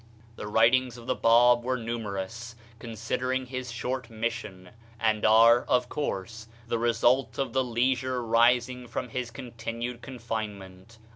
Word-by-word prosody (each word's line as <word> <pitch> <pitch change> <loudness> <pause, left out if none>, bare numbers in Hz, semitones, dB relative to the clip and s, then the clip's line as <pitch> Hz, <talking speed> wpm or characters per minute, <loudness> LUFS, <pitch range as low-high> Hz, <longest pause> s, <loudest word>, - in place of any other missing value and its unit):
The 105 - -7
writings 120 +3 +3
of 120 - -12
the - - 0
Bab 120 +1 +4
were 130 +1 -1
numerous, 115 0 -5 0.2
considering 120 +3 -3
his 130 0 -6
short 125 -1 -4
mission, 110 -5 -5 0.3
and 110 -1 +1
are, 115 +2 +6
of 125 0 +1
course, 110 -6 -4 0.2
the 115 0 -2
result 120 +3 +2
of 135 -4 -2
the 130 - +2
leisure 125 +1 0
rising 120 +2 +2
from 125 - -4
his 125 0 -4
continued 120 -1 -6
confinement. 110 -5 -7
120 Hz, 135 wpm, -27 LUFS, 115-125 Hz, 0.3 s, are